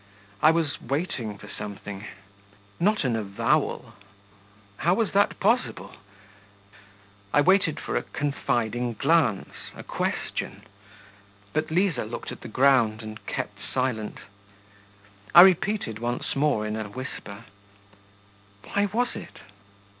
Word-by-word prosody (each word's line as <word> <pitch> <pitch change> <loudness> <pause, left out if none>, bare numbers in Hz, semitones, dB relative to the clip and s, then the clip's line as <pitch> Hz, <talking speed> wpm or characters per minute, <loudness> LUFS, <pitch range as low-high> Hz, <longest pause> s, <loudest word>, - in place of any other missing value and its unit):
I 155 - +7
was 160 -3 0
waiting 125 - -3
for - - -12
something... 100 0 -7 0.7
not 210 +4 +2
an 125 -3 +1
avowal 100 -3 0 0.8
how 175 +2 +2
was 225 -1 0
that 200 +1 +2
possible? 245 +2 +1 1.4
I 145 - +5
waited 180 -2 +3
for - - -4
a - - +2
confiding 120 -5 -1
glance, 125 - +2 0.2
a - - -9
question.... 100 - -3 0.9
But 155 0 0
Liza 170 - +1
looked 115 - -6
at - - -9
the - - -7
ground, 120 -3 +3
and 110 -1 -8
kept 100 -1 -4
silent. 125 -5 -1 1.2
I 175 - +13
repeated 190 - +2
once 120 +1 -2
more 135 -7 +2
in 105 0 -2
a 110 -1 -4
whisper: 115 -2 -8 1.2
'Why 205 0 0
was 240 +5 -1
it?' - - -9
130 Hz, 115 wpm, -26 LUFS, 110-170 Hz, 1.4 s, I